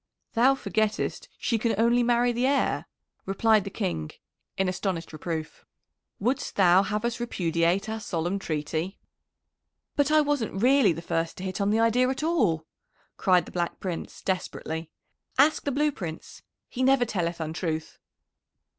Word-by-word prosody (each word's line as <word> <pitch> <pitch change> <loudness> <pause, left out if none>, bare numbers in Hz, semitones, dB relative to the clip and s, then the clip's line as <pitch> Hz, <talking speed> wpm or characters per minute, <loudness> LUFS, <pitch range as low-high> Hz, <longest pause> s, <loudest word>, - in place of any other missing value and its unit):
"Thou 255 +4 +5
forgettest 215 -2 -1
she 230 -3 0
can 225 0 +1
only 235 +2 +4
marry 240 0 +3
the 240 +2 +1
heir," 275 0 +1 0.4
replied 215 +1 +3
the - - -3
King 80 - -3 0.5
in 190 - +1
astonished 185 -3 -3
reproof. 155 0 -5 0.6
"Wouldst 250 +7 -1
thou 185 -1 +6
have 210 +3 -2
us 235 0 -2
repudiate 175 -3 0
our 220 0 -3
solemn 180 -1 -2
treaty?" 155 +2 -3 1.0
"But 285 0 +2
I 310 0 +5
wasn't 260 -9 -1
really 260 -5 +5
the 165 +1 -5
first 165 0 -2
to 185 - -7
hit 190 +1 -3
on 200 - +2
the 215 +2 +2
idea 240 +3 +3
at 265 +3 -2
all!" 215 - +1 0.5
cried 180 -3 +3
the - - -11
Black 175 -1 -2
Prince 180 -3 -5
desperately. 165 -3 -3 0.5
"Ask 310 +2 +4
the 285 - +1
Blue 295 +3 +2
Prince! 165 - -7 0.3
he 255 - -5
never 260 -1 +4
telleth 175 -6 -2
untruth." 160 0 -3
200 Hz, 155 wpm, -27 LUFS, 170-245 Hz, 1.0 s, thou